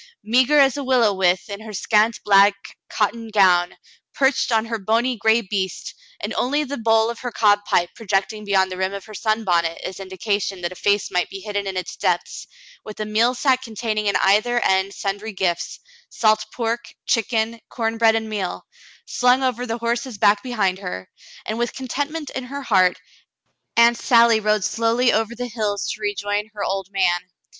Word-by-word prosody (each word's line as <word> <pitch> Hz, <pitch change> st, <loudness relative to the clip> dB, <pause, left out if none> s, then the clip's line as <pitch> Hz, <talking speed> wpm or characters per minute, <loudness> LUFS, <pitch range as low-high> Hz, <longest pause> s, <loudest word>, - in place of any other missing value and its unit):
Meagre 255 Hz, +6 st, +3 dB
as 275 Hz, -1 st, +4 dB
a 285 Hz, -, -3 dB
willow 250 Hz, -5 st, +3 dB
withe 185 Hz, -1 st, +1 dB
in 200 Hz, -1 st, -6 dB
her 220 Hz, -1 st, -9 dB
scant 215 Hz, +3 st, +1 dB
black 200 Hz, 0 st, +3 dB
cotton 225 Hz, +2 st, -1 dB
gown, 185 Hz, -4 st, +3 dB, 0.4 s
perched 265 Hz, -2 st, +2 dB
on 225 Hz, -1 st, +2 dB
her 225 Hz, -1 st, -4 dB
bony 230 Hz, +5 st, +1 dB
gray 220 Hz, +1 st, +3 dB
beast, 190 Hz, -2 st, -4 dB, 0.3 s
and -, -, -4 dB
only 290 Hz, +4 st, 0 dB
the 285 Hz, 0 st, -5 dB
bowl 225 Hz, -1 st, +2 dB
of 235 Hz, -, -9 dB
her 250 Hz, -, -4 dB
cob 210 Hz, -2 st, +3 dB
pipe 175 Hz, 0 st, +1 dB
projecting 210 Hz, 0 st, -2 dB
beyond 190 Hz, -2 st, +1 dB
the 185 Hz, -, -5 dB
rim 190 Hz, +1 st, -1 dB
of 200 Hz, -, -8 dB
her 215 Hz, -, -12 dB
sunbonnet 180 Hz, -7 st, 0 dB
as 185 Hz, -, -6 dB
indi 190 Hz, -1 st, -9 dB
cation 200 Hz, -2 st, -2 dB
that 175 Hz, 0 st, -3 dB
a -, -, -9 dB
face 205 Hz, +2 st, 0 dB
might 180 Hz, 0 st, 0 dB
be 195 Hz, -, -8 dB
hidden 205 Hz, -1 st, -3 dB
in 190 Hz, -1 st, -4 dB
its 185 Hz, -, -5 dB
depths, -, -, -2 dB, 0.4 s
with 215 Hz, -, -10 dB
a 215 Hz, -, -2 dB
meal 225 Hz, +4 st, +2 dB
sack 260 Hz, 0 st, +2 dB
containing 220 Hz, -3 st, -3 dB
in 200 Hz, -, +1 dB
either 215 Hz, +5 st, +3 dB
end 190 Hz, +1 st, +1 dB
sundry 205 Hz, +2 st, -4 dB
gifts 180 Hz, -3 st, -2 dB, 0.2 s
— 475 Hz, -, -29 dB
salt 215 Hz, -1 st, +3 dB
pork, 235 Hz, 0 st, -3 dB
chicken, 230 Hz, 0 st, 0 dB
corn 225 Hz, -1 st, -3 dB
bread, 225 Hz, -1 st, +5 dB
and 220 Hz, 0 st, -2 dB
meal 205 Hz, -4 st, -4 dB, 0.2 s
— -, -, -26 dB
slung 250 Hz, +2 st, +2 dB
over 250 Hz, -1 st, -1 dB
the 230 Hz, +1 st, -2 dB
horse's 235 Hz, 0 st, -3 dB
back 205 Hz, +1 st, +3 dB
behind 205 Hz, -7 st, -1 dB
her, 180 Hz, -, -7 dB, 0.3 s
and 220 Hz, +2 st, -3 dB
with 240 Hz, 0 st, -2 dB
contentment 285 Hz, +4 st, -4 dB
in 260 Hz, -, -5 dB
her 280 Hz, +2 st, -6 dB
heart. 185 Hz, -6 st, +3 dB, 0.8 s
Aunt 235 Hz, 0 st, +5 dB
Sally 235 Hz, -3 st, +5 dB
rode 215 Hz, -1 st, +1 dB
slowly 230 Hz, +3 st, +1 dB
over 225 Hz, +1 st, 0 dB
the 245 Hz, +1 st, -4 dB
hills 215 Hz, -4 st, -2 dB
to 215 Hz, -, -8 dB
rejoin 205 Hz, 0 st, -2 dB
her 205 Hz, -, -4 dB
old 195 Hz, -1 st, -2 dB
man. 185 Hz, -2 st, 0 dB
215 Hz, 190 wpm, -21 LUFS, 195-235 Hz, 0.8 s, bread